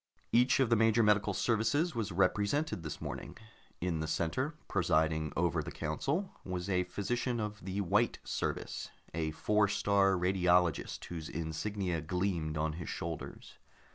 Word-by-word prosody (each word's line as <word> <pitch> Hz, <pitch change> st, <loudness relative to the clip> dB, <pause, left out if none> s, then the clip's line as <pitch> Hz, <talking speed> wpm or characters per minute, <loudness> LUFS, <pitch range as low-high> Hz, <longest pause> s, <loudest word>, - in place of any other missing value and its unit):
Each 125 Hz, +3 st, +4 dB
of 130 Hz, -3 st, +3 dB
the -, -, +7 dB
major 115 Hz, +1 st, +4 dB
medical 105 Hz, 0 st, +3 dB
services 115 Hz, -, +1 dB
was 110 Hz, -4 st, -2 dB
represented 100 Hz, -, +1 dB
this 80 Hz, -3 st, -5 dB
morning. -, -, -6 dB, 0.4 s
In 85 Hz, -2 st, -1 dB
the 80 Hz, -, -2 dB
center, 105 Hz, -, -1 dB
presiding 80 Hz, -3 st, +1 dB
over 85 Hz, 0 st, +2 dB
the -, -, -6 dB
council, 140 Hz, -, -2 dB
was 90 Hz, -1 st, -4 dB
a 90 Hz, -2 st, +1 dB
physician 120 Hz, +7 st, -2 dB
of 105 Hz, -2 st, -4 dB
the 95 Hz, +2 st, -2 dB
White 105 Hz, +5 st, +2 dB
Service, -, -, -3 dB, 0.2 s
a 80 Hz, -1 st, -1 dB
Four 105 Hz, +6 st, +2 dB
star 100 Hz, -1 st, +3 dB
Radiologist 90 Hz, -2 st, +2 dB
whose 80 Hz, -3 st, -6 dB
insignia 85 Hz, +2 st, -2 dB
gleamed 85 Hz, -2 st, -1 dB
on 75 Hz, 0 st, 0 dB
his 85 Hz, 0 st, -6 dB
shoulders. -, -, -6 dB
95 Hz, 145 wpm, -33 LUFS, 85-105 Hz, 0.4 s, the